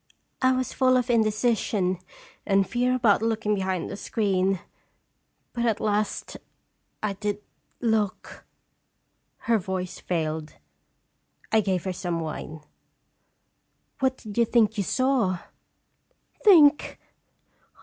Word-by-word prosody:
I 260 0 +4
was 255 0 -2
full 255 -1 +3
of 250 0 0
indecision 215 -4 +1 0.4
and 195 -2 +2
fear 250 +1 +1
about 225 -5 +3
looking 225 -1 0
behind 190 -3 -1
the - - -6
screen, 195 -3 0 0.9
but, 235 - -2
at 225 -3 +1
last, 210 0 -1 0.7
I 210 -2 0
did 205 +1 -4 0.4
look" 220 -4 -1 1.0
Her 230 -1 +2
voice 185 -1 -4
failed. 155 -3 -3 1.0
I 220 0 +4
gave 185 -3 -1
her 190 - -3
some 175 -2 -3
wine 155 -1 -6 0.7
" - - -48
What 260 -1 +1
did 215 0 -6
you 235 - +5
think 220 -2 +2
you 205 - 0
saw?" 250 -5 +1 0.5
" - - -34
Think! 310 -8 +6
210 Hz, 120 wpm, -25 LUFS, 190-235 Hz, 1.0 s, Think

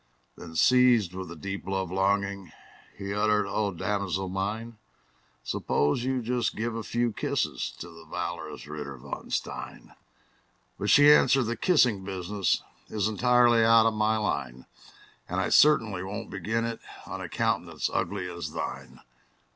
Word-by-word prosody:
Then, 80 -1 -11
seized 120 -3 +4
with 95 -2 -6
a - - -7
deep 100 +3 -5
love 95 -2 -2
longing, 100 -1 0 0.5
He 100 0 -4
uttered, 105 0 +2
"O 100 +1 -1
damosel 95 0 -2
mine, 105 +4 -4 0.6
Suppose 75 - 0
you 130 -1 -1
just 120 0 -1
give 115 +1 -2
a 115 - -3
few 120 +1 -1
kisses - - -2
To 85 - -8
the 85 -1 -13
valorous 80 - -5
Ritter 75 -2 -7
von 60 - -8
Stein!" - - -5 0.9
But 105 - -1
she 145 0 +8
answered, 135 -2 +4
"The 120 +1 -2
kissing 125 - +3
business 95 0 -1 0.3
Is 105 -1 0
entirely 120 +1 +4
out 115 0 +6
of 115 - +3
my 110 +1 +1
line; 65 - -3 0.6
And - - -1
I - - 0
certainly 115 -11 +4
will 100 +3 -4
not - - -15
begin 110 +5 -2
it 115 -1 -4 0.3
On - - -6
a - - -6
countenance - - -1
ugly 90 - -2
as 85 -3 -6
thine!" - - -6
105 Hz, 155 wpm, -27 LUFS, 95-115 Hz, 0.9 s, she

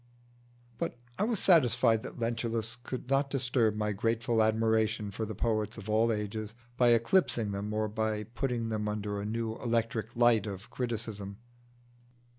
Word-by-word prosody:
But - - -3 0.2
I 210 - +3
was 230 -1 0
satisfied 120 - +4
that - - -8
Lentulus 115 -1 -1
could 125 +1 -7
not 135 +1 +2
disturb 125 -5 +1
my 105 0 -1
grateful 115 +2 +1
admiration 110 -1 +1
for 110 +2 -4
the 110 - -5
poets 110 0 -1
of 110 -1 -5
all 115 +2 +3
ages 105 0 -3 0.2
by 125 0 +4
eclipsing 115 - +3
them, 100 +1 -3
or 110 0 0
by 110 0 -1
putting 120 +1 -2
them 105 -1 -2
under 105 -1 -3
a - - -4
new 115 0 -2
electric 115 -1 -1
light 120 -3 +4
of 100 0 -7
criticism. 110 -5 -4
110 Hz, 155 wpm, -30 LUFS, 105-120 Hz, 0.2 s, satisfied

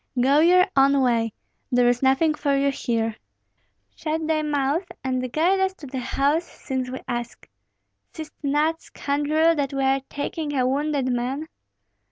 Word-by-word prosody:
"Go 275 +4 +4
your 360 +3 +6
own 275 +1 +5
way; 230 -2 +1 0.4
there 245 -1 +4
is 245 0 +2
nothing 270 +4 +3
for 285 -2 0
you 280 0 +2
here." 225 -4 -2 0.8
"Shut 315 0 -3
thy 310 0 +1
mouth, 295 +3 0 0.2
and 255 -1 -2
guide 350 +7 +2
us 380 0 0
to 315 - -11
the 260 -1 -5
house 280 +6 +1
since 260 -2 -5
we 260 - -5
ask. 240 -1 -5 0.6
Seest 315 -2 -8
not, 300 +3 +1
scoundrel, 300 +3 +1
that 285 -3 -2
we 270 - 0
are 270 0 +2
taking 290 +1 -4
a 255 - +2
wounded 280 0 0
man?" 260 +6 -2
280 Hz, 160 wpm, -24 LUFS, 255-310 Hz, 0.8 s, your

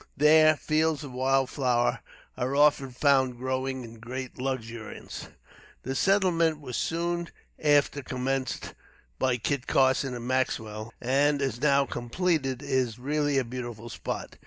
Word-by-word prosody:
There, 155 +1 +6
fields 155 0 0
of 140 - -7
wild 130 +1 +1
flowers 125 -3 +1 0.4
are 130 +2 -2
often 145 -2 +4
found 130 -1 +2
growing 130 +1 -2
in 115 -1 -11
great 130 +3 -6
luxuriance. 115 -4 -5 0.6
The 130 - -3
settlement 170 -2 +2
was 130 -5 -6
soon 170 +1 -1 0.3
after 145 -1 +3
commenced 130 +1 -3 0.5
by 130 -2 +2
Kit 130 +3 -2
Carson 130 -1 +2
and 120 0 -6
Maxwell, 110 -4 -1
and, 140 +3 +2
as 135 -4 -2
now 140 -2 +4
completed, 135 +1 -1
is 130 -5 0
really 145 +2 0
a 135 - +3
beautiful 120 -2 -7
spot. - - -5
130 Hz, 135 wpm, -27 LUFS, 125-145 Hz, 0.6 s, There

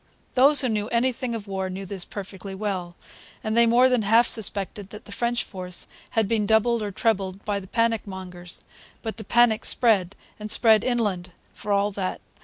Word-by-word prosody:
Those 280 +3 +6
who 260 - 0
knew 210 -1 -1
anything 240 0 0
of 215 -3 -6
war 190 -1 -3
knew 190 +1 -6
this 190 -1 -3
perfectly 195 -1 -8
well; 190 -4 -4 0.5
and 215 0 -1
they 235 0 +5
more 245 +3 +5
than 250 -3 +2
half 225 +3 +4
suspected 200 -2 -2
that 210 - -11
the - - -12
French 240 +3 -1
force 180 -2 -4 0.3
had 220 -2 +3
been 210 -1 0
doubled 220 +2 +3
or 205 -1 -3
trebled 195 -2 -1
by 205 -1 -1
the 190 - -11
panic 230 +1 0
mongers. 180 -2 -8 0.4
But 220 -1 -5
the 220 - -7
panic 230 +1 +3
spread, 205 -6 +2 0.2
and 210 0 -6
spread 220 -1 +5
inland, 205 -8 -1 0.2
for 210 - -6
all 200 +1 +2
that. 190 -2 -3
210 Hz, 190 wpm, -24 LUFS, 190-230 Hz, 0.5 s, Those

